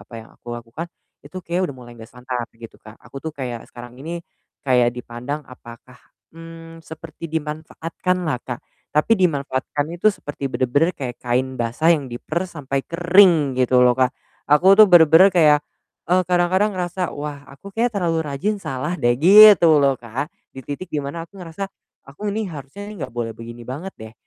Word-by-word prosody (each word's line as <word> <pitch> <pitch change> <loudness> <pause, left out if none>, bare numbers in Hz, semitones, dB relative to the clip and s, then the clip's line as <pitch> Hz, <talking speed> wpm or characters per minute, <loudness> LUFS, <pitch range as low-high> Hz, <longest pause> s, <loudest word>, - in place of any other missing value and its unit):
apa 115 - -15
yang - - -19
aku 120 - -9
lakukan, 120 +8 -7 0.4
itu - - -12
kayaknya 175 +2 -1
udah - - -16
mulai 120 -1 -12
nggak 110 - -11
santai 125 -1 -5
gitu, 115 - -11
Kak. 110 +1 -14
Aku 135 - -10
tuh 160 +2 -6
kayak 125 -5 -6
sekarang 120 0 -12
ini, 170 +4 -5 0.4
kayak 125 -3 +3
dipandang 125 +4 -6
apakah, 125 0 -14 0.4
mmm, 165 0 -11
seperti 160 +1 -9
dimanfaatkan 160 +3 -3
lah, 145 -6 -1
Kak. 120 -2 -6 0.3
Tapi 150 +9 +3
dimanfaatkannya 145 -1 -1
tuh 215 - +4
seperti 145 -1 -6
bener-bener 145 +7 +1
kayak 125 -3 -5
kain 130 +2 -1
basah 120 +8 +1
yang 145 -4 -4
diperas 170 +9 -4
sampai 140 -2 -3
kering, 170 -5 +4
gitu 125 0 +3
loh, 125 0 +5
Kak. 130 -1 +2 0.4
Aku 175 +7 +6
tuh 215 - +10
benar-benar 175 +2 +7
kayak 150 -4 +5 0.5
e 180 - +3
kadang-kadang 180 +4 +2
ngerasa, 180 0 -2
"Wah, 145 -1 -6
aku 140 +9 -13
kayaknya 235 +1 0
terlalu 165 -2 0
rajin 170 +9 -2
salah 135 +6 -3
deh." 120 -7 +2
Gitu 195 +1 +8
loh, 140 -1 +3
Kak. 120 +6 -5 0.2
Di 135 - -8
titik 145 +8 -7
dimana 145 +3 -4
aku 200 - -35
ngerasa, 180 +3 -6 0.4
aku 180 +10 -5
nih 215 +1 -2
harusnya 150 +8 -9
nih - - -8
enggak - - -11
boleh 115 -1 -3
begini 120 +1 -10
banget 155 +10 -6
deh. 110 0 -10
150 Hz, 175 wpm, -21 LUFS, 125-175 Hz, 0.5 s, tuh